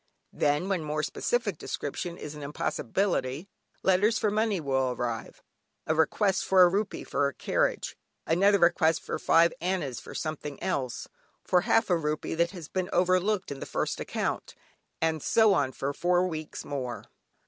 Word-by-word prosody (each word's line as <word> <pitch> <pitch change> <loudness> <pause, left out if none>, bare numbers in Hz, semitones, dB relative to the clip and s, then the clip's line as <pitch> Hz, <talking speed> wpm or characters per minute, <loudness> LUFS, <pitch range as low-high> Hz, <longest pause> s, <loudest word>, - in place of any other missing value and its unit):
Then, 145 +5 +1
when 190 -5 0
more 155 0 -2
specific 205 +2 -1
description 170 +4 -4
is 150 - -7
an 150 - -9
impossibility, 145 - -1 0.4
letters 205 +4 +3
for 210 - +1
money 215 -2 +1
will 135 -3 0
arrive; 120 -2 -4 0.4
a 155 - +1
request 185 +5 +2
for 190 -1 +6
a - - +8
rupee 200 +3 -1
for 140 -1 0
carriage, - - -1 0.3
another 195 +5 +4
request 170 -2 +3
for - - -3
five 170 +1 +4
annas 175 -8 -1
for - - -11
something 150 -2 -4
else, 130 -3 -2 0.4
for 180 - +3
half 225 0 +2
a - - +5
rupee 150 -1 -2
that 170 +1 +2
has 175 -5 -9
been 185 +1 -2
overlooked 185 +2 +2
in 140 - -5
the - - -6
first - - -2
account, - - -3 0.5
and 160 -1 +1
so 220 +4 +4
on 140 -7 +1
for 135 +2 -3
four 175 +4 +2
weeks 155 -3 -5
more. 130 -4 -4
170 Hz, 160 wpm, -28 LUFS, 145-190 Hz, 0.5 s, a